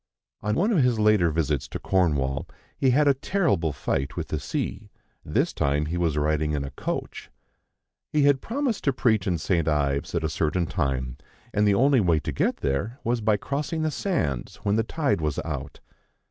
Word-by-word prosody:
On 105 0 0
one 205 - +2
of 185 -9 +3
his 125 -2 +2
later 105 -5 +4
visits 75 -4 -1
to - - -5
Cornwall, 70 -7 0 0.3
he 135 - +2
had 145 +4 +4
a 140 - +6
terrible 130 - 0
fight 70 -1 -2
with - - -3
the - - -2
sea; 105 +2 -4 0.3
this - - 0
time 70 +2 +1
he 80 +3 -3
was 85 -4 0
riding 75 0 +1
in 70 -2 -1
a 70 - -6
coach. - - -5 0.8
He 150 -1 +3
had 140 -1 +4
promised 255 -2 -2
to 140 - +3
preach 110 -6 +1
in 90 -2 +1
St. 85 0 0
Ives 70 0 0
at 85 - 0
a - - +1
certain 80 +3 0
time, 65 -5 -2 0.4
and 105 0 +3
the 100 - +4
only 135 +3 +4
way 85 -6 +3
to - - -3
get - - 0
there 85 - -1
was 120 0 0
by 105 -1 +3
crossing 150 +7 -2
the 155 - 0
sands 110 - -2
when 100 0 +1
the 110 - +3
tide 125 - 0
was 75 -2 -1
out. - - -5
95 Hz, 195 wpm, -25 LUFS, -, 0.8 s, a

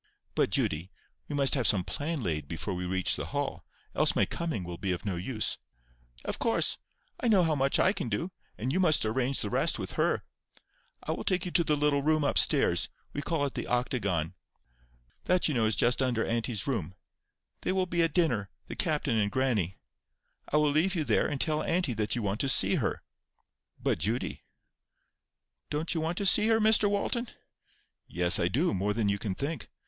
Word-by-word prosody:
"But, - - +1
Judy, 80 +5 -1 0.4
we 145 - -4
must 140 -1 +2
have 130 -6 +2
some 95 -2 +4
plan 145 - -3
laid 75 -6 -2
before 85 +5 -4
we 90 0 -4
reach 95 0 +1
the - - -4
Hall; - - -3 0.3
else - - +3
my - - +3
coming 165 - -3
will 85 -1 -7
be 95 -2 -1
of 90 +3 -4
no 100 -3 -1
use." 110 +6 -3 0.7
"Of - - -3
course. - - +1 0.4
I - - -1
know 200 -5 +5
how 160 -2 +2
much 135 -1 +2
I 185 - +3
can 125 - -4
do, 140 - -2 0.3
and 125 +5 -2
you - - +1
must 155 -9 +4
arrange 130 +4 0
the 105 - -3
rest - - +1
with - - -5
her. - - +1 0.8
I - - -3
will - - -3
take 180 -1 0
you 180 - -4
to 170 - +3
the 150 -2 +1
little 145 -1 +2
room 155 +1 +2
up 145 - +3
stairs—we 145 - 0
call 155 -2 -1
it 140 - -4
the - - -4
octagon. 100 - -1 0.9
That 180 0 +3
you 155 - -1
know 115 -4 +2
is 110 - +1
just 125 +2 +2
under 125 -3 +1
auntie's 115 -2 -1
room. 100 - -3 0.7
They - - -1
will 190 0 +1
be 175 -1 0
at 165 -1 +2
dinner—the 125 - -1
captain 150 - 0
and 100 -1 +1
grannie. 110 -7 0 0.7
I 150 - +3
will 150 -1 +3
leave 165 +6 +2
you 160 - 0
there, 115 -6 +2
and 145 - -3
tell 155 +1 +1
auntie 165 -5 0
that 105 0 -1
you 120 - -2
want 100 +1 -1
to 135 - +1
see - - +4
her." - - -2 0.8
"But, - - 0
Judy,— 110 +10 -2 0.7
" - - -51
"Don't 155 +4 -2
you 165 - -1
want 165 +2 -2
to 200 - -1
see 210 +3 +5
her, 225 0 +4
Mr 215 -1 +5
Walton?" 235 +4 -1 0.8
"Yes, 90 +2 +4
I 85 - +2
do; 140 - +1
more 100 +2 -1
than 110 -3 0
you 100 0 0
can 100 -3 -3
think." 150 - -4
130 Hz, 205 wpm, -29 LUFS, 105-160 Hz, 0.9 s, know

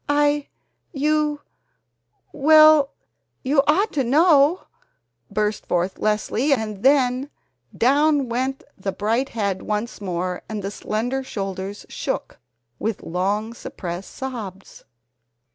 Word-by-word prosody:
"I 290 0 +2 0.5
you 300 +1 +1 0.9
WELL, 310 -1 +6 0.5
YOU 275 +2 +3
ought 390 +9 +2
to 275 - +1
know 295 +4 +4 0.3
!" 115 +1 -52
burst 210 0 -1
forth 180 +2 -1
Leslie 215 +6 +1
and 215 -5 -3
then 265 0 +3 0.5
down 285 +2 +3
went 260 +3 -2
the 195 0 -3
bright 225 +7 0
head 200 -4 -2
once 210 +1 -3
more 180 -1 -3
and 215 -2 -4
the 195 - -3
slender 240 +6 -2
shoulders 195 -3 -5
shook - - -4 0.4
with 220 -1 -3
long 200 +6 -1
suppressed 180 -5 -7
sobs. 215 -8 -7
235 Hz, 110 wpm, -22 LUFS, 200-285 Hz, 0.9 s, WELL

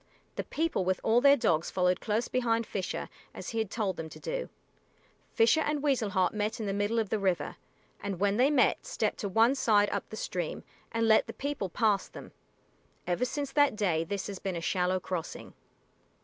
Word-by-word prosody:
The - - -2
people 320 - -1
with 185 0 0
all 230 +2 +4
their 280 +1 +7
dogs 165 - +1
followed 180 -1 +1
close 220 +2 0
behind 230 -2 0
Fisher, 190 -3 -4 0.3
as - - -6
he 225 - -2
had 220 -3 -1
told 205 -4 -2
them 160 -1 -5
to - - -11
do. - - -4 0.8
Fisher 235 +8 +4
and 295 -1 -1
Weasel 265 -8 +1
Heart 185 -3 +1
met 210 +1 -2
in 220 - -3
the 195 - -1
middle 205 +3 0
of 220 -3 0
the 220 - 0
river, 190 -3 0 0.5
and 200 -3 -4
when 200 +1 +2
they 260 +3 +4
met 290 -4 +3
they - - -14
stepped - - -1
to 205 - -2
one 225 +6 +4
side 210 -6 +3
up 200 - -3
the 220 - -7
stream 175 -6 -3 0.3
and 230 0 +1
let 220 0 +5
the - - -6
people 280 -9 -3
pass 210 0 +1
them. - - -11 0.7
Ever 180 +8 0
since 280 +1 -3
that 290 -4 +3
day 175 -6 +1
this 200 +4 -4
has 200 -2 -6
been 190 -2 -3
a - - -2
shallow 180 +2 0
crossing. 180 -2 -5
210 Hz, 205 wpm, -30 LUFS, 185-245 Hz, 0.8 s, their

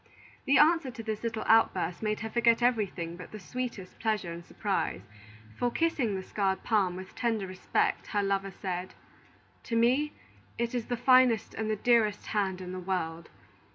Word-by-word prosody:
The 275 -1 +4
answer 320 -2 +5
to 235 -2 -8
this 220 -1 -3
little 230 -1 -3
outburst 190 -5 +3
made 215 -1 -1
her 225 - -3
forget 235 0 +3
everything 195 -8 0
but 180 - -10
the 215 - -8
sweetest 230 -2 -6
pleasure 215 -6 -1
and 170 +1 -8
surprise; - - -2 0.5
for, 245 - 0
kissing 255 -7 0
the 190 - -4
scarred 195 -1 -1
palm 195 -5 +2
with 185 +1 -9
tender 225 -4 -1
respect, 185 0 -1
her 205 -1 0
lover 195 0 0
said: 185 -1 -5 0.7
"To 230 - -2
me 255 +6 +3 0.4
it 235 +1 -1
is 240 -3 -2
the 245 - -1
finest 250 -2 +4
and 220 -1 -3
the 215 - +1
dearest 215 -2 +2
hand 190 -3 -1
in 180 0 -6
the 185 - -5
world. 170 -3 -3
215 Hz, 175 wpm, -29 LUFS, 190-235 Hz, 0.7 s, answer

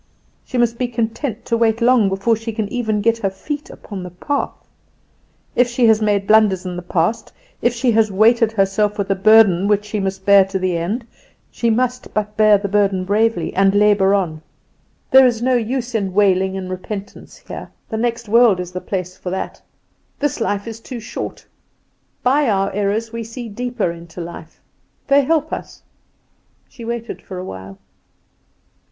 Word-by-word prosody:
She 255 - -5
must 235 -1 +1
be 250 - 0
content 230 +1 -3
to 230 - 0
wait 225 -1 +2
long 235 -4 +4
before 195 +4 +1
she 225 +1 -6
can 215 -2 -2
even 220 -3 -1
get 230 +2 +2
her 200 -3 0
feet 290 +10 -6
upon 200 -2 -8
the 180 - -7
path. 280 - -3 1.0
If 245 - +4
she 245 0 +1
has 220 -1 +4
made 205 -2 +1
blunders 210 -3 +4
in 180 -1 -4
the 180 - -5
past, 175 +4 -1 0.3
if 240 - +3
she 240 +1 +1
has 220 -1 +3
weighted 225 +3 +4
herself 205 +1 +1
with 200 -1 -1
a - - +2
burden 200 -2 +5
which 205 0 +1
she 210 0 -3
must 190 -1 -3
bear 200 -1 +7
to 195 0 -3
the 185 -1 -1
end, 200 +9 -2 0.5
she 235 - 0
must 250 +2 -1
but 210 0 -2
bear 215 -1 +5
the 200 0 -3
burden 195 -2 +1
bravely, 210 -2 +1
and 195 +1 +3
labour 205 -1 +4
on. 165 -6 -2 0.7
There 265 -1 +8
is 235 -2 0
no 255 +2 +1
use 245 +1 -1
in 195 -4 -2
wailing 190 -2 +2
and 185 -1 -5
repentance 195 +2 -7
here: - - -9 0.2
the 220 - -3
next 235 0 -2
world 225 -3 +5
is 180 -1 -5
the 185 0 -5
place 185 -2 -4
for 185 - -6
that; 190 +1 -5 0.6
this 290 -4 -2
life 205 -2 -1
is 225 -1 -7
too 240 +1 -8
short. 220 - -7 0.8
By 275 +1 +3
our 195 -1 0
errors 205 +3 -1
we 230 0 -4
see 230 +2 -7
deeper 240 -3 -2
into 170 0 -11
life. 170 -1 -9 0.5
They 280 0 +5
help 315 +2 0
us." - - -7 0.8
She 240 - -12
waited 235 0 -5
for 185 - -9
a 180 - -5
while. 95 - -9
210 Hz, 185 wpm, -19 LUFS, 195-235 Hz, 1.0 s, There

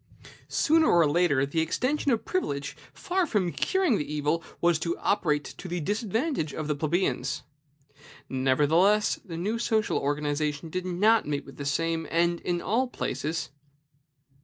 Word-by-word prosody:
Sooner 320 0 +3
or 170 -3 +5
later 145 -3 +2
the 145 +4 -2
extension 255 - 0
of 230 -4 +1
privilege, 145 - -2 0.2
far 365 -1 -1
from 195 - 0
curing 370 - +1
the 150 - -4
evil, 150 +3 0 0.2
was 170 -2 +3
to 170 +1 -2
operate 150 -7 +1
to 180 - -9
the 175 0 -2
disadvantage 210 - -1
of 155 -1 -4
the 150 - +1
plebeians. 155 +3 -1 0.8
Nevertheless, 150 +11 +3
the 165 -4 -7
new 210 +7 -1
social 220 -2 +1
organization 145 +1 -2
did 185 +1 -3
not 210 +4 +3
meet 145 -1 -2
with 135 - -13
the 140 - -5
same 165 +2 -1
end 170 +1 +1
in 175 -1 -2
all 240 +6 +1
places. 155 - -3
170 Hz, 150 wpm, -27 LUFS, 150-215 Hz, 0.8 s, or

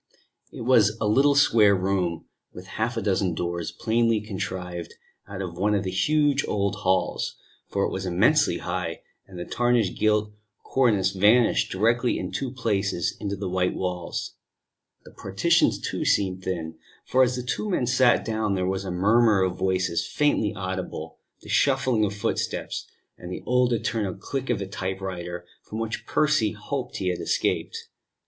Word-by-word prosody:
It - - -9
was 115 -3 +4
a - - -1
little 140 +7 +4
square 110 -7 +5
room, 90 -3 -1 0.3
with 90 - -10
half 110 +5 -3
a 115 - -2
dozen 95 -3 +1
doors, 85 0 -3
plainly 115 -1 +1
contrived 90 -4 -5 0.3
out 95 -1 -5
of 85 -1 -7
one 105 +2 +2
of 100 - 0
the 95 - -3
huge 145 +8 +2
old 100 -1 0
halls, 95 0 0 0.3
for 100 - -1
it - - -2
was 95 0 -3
immensely 110 - +3
high, 90 -2 -4 0.2
and 95 -2 -11
the 90 - -5
tarnished 120 -5 +1
gilt 105 -1 +2 0.3
cornice 105 -8 +2
vanished 105 - +3
directly 115 +5 +1
in 90 - -4
two 135 - -3
places 105 -8 -1
into 100 -1 -3
the 100 0 -4
white 90 0 0
walls. 90 -2 -4 0.7
The - - -13
partitions, - - +2
too, - - -3
seemed 95 -2 +1
thin; 80 -3 -4 0.3
for 130 - +2
as 125 -1 +3
the 125 - -4
two 125 - -2
men 175 -10 +1
sat 125 0 +3
down 110 -3 -1
there 95 -1 -1
was 95 +1 -1
a 95 - -5
murmur 105 +3 +3
of 90 -1 -1
voices 95 -2 0
faintly 145 -8 +1
audible, 95 -1 -5 0.2
the - - -14
shuffling 130 -5 +2
of 100 0 -3
footsteps, 100 - -3 0.3
and 90 0 -8
the - - -6
old 125 0 +2
eternal 110 -4 -1
click 135 +7 -5
of - - +2
the 100 - -4
typewriter 95 -2 -5 0.2
from 110 - -8
which 115 0 -4
Percy 150 -9 +2
hoped 130 +5 -5
he 95 - -1
had 90 - -2
escaped. - - -1
100 Hz, 170 wpm, -25 LUFS, 95-120 Hz, 0.7 s, square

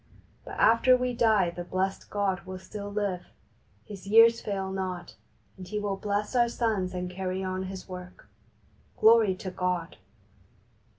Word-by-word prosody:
But - - -8
after 240 +3 +5
we 250 0 -1
die 215 -7 +3
the 175 +1 -6
blessed 190 +2 -2
God 195 -2 -1
will 185 0 -6
still 200 +2 -8
live. 200 -3 -2 0.6
His 200 -3 -10
years 230 +2 +6
fail 195 -2 -3
not, 185 -2 -4 0.4
and 185 -1 -9
He 210 - -4
will 205 -1 -1
bless 205 +4 -2
our 240 -1 +4
sons 210 -6 -1
and 180 0 -3
carry 185 +1 -3
on 185 0 -3
His 190 0 -7
Work. 180 -1 -10 0.7
Glory 220 -4 +5
to 185 0 -6
God 180 -2 -2
195 Hz, 155 wpm, -28 LUFS, 185-210 Hz, 0.7 s, years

